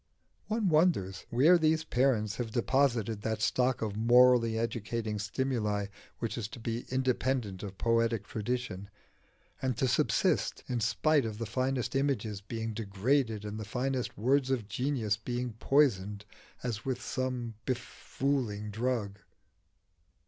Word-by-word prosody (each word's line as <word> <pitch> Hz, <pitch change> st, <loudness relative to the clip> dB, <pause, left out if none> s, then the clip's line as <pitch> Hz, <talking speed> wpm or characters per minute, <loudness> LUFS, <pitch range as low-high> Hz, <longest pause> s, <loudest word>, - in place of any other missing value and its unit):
One 220 Hz, -1 st, 0 dB
wonders 150 Hz, -, +2 dB
where 155 Hz, +9 st, +5 dB
these 160 Hz, 0 st, +2 dB
parents 120 Hz, -7 st, +1 dB
have 120 Hz, -2 st, -2 dB
deposited 115 Hz, -3 st, +1 dB
that 110 Hz, 0 st, -2 dB
stock 125 Hz, +2 st, +1 dB
of 105 Hz, -2 st, -3 dB
morally 120 Hz, 0 st, +5 dB
educating 115 Hz, -1 st, -2 dB
stimuli 105 Hz, -1 st, -1 dB, 0.3 s
which 115 Hz, +1 st, -3 dB
is 105 Hz, -, -3 dB
to 120 Hz, +2 st, -10 dB
be 115 Hz, +1 st, -4 dB
independent 130 Hz, -5 st, 0 dB
of 100 Hz, -2 st, -7 dB
poetic 115 Hz, -2 st, +1 dB
tradition, 110 Hz, -3 st, -3 dB, 0.7 s
and 130 Hz, -3 st, -1 dB
to 130 Hz, -, +2 dB
subsist -, -, +1 dB
in 125 Hz, -2 st, -2 dB
spite 145 Hz, +6 st, +2 dB
of 110 Hz, -2 st, -4 dB
the 115 Hz, -, -3 dB
finest 130 Hz, +2 st, -1 dB
images 130 Hz, -7 st, 0 dB
being 115 Hz, +2 st, -4 dB
degraded 110 Hz, +2 st, 0 dB
and 105 Hz, +1 st, -5 dB
the -, -, -4 dB
finest 125 Hz, +4 st, -2 dB
words 130 Hz, +4 st, +2 dB
of 125 Hz, -6 st, -1 dB
genius 120 Hz, -4 st, 0 dB
being 120 Hz, +1 st, -3 dB
poisoned 105 Hz, -8 st, +2 dB, 0.4 s
as 115 Hz, -4 st, -3 dB
with 130 Hz, -2 st, -2 dB
some 125 Hz, -2 st, -3 dB
befooling 125 Hz, -4 st, -2 dB
drug. 110 Hz, -3 st, -2 dB
120 Hz, 135 wpm, -31 LUFS, 105-130 Hz, 0.7 s, where